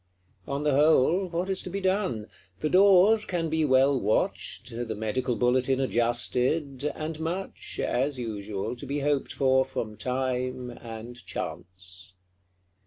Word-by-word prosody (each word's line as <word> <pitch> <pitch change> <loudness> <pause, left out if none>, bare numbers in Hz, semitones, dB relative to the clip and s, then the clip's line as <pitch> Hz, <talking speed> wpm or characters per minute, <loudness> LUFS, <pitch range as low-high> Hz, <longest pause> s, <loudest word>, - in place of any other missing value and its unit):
On 140 +1 -2
the 150 - +2
whole, 155 +5 +4
what 175 +1 -2
is 190 -1 -1
to - - -7
be 195 +2 -3
done? 185 - 0 0.4
The 155 - 0
doors 200 +3 +6
can 170 -5 -2
be 160 0 +2
well 135 0 +4
watched; 105 +2 -1
the 115 -1 -4
Medical 120 +4 -1
Bulletin 130 +2 +2
adjusted; 130 +4 0
and 155 0 -5
much, 175 +4 -4
as 135 +2 0
usual, 105 -4 -4
be 140 +3 -4
hoped 145 -1 0
for 130 -1 +3
from 115 -5 -5
time 125 -1 -2
and 115 +1 -9
chance. 90 +1 -6
130 Hz, 135 wpm, -27 LUFS, 120-160 Hz, 0.4 s, doors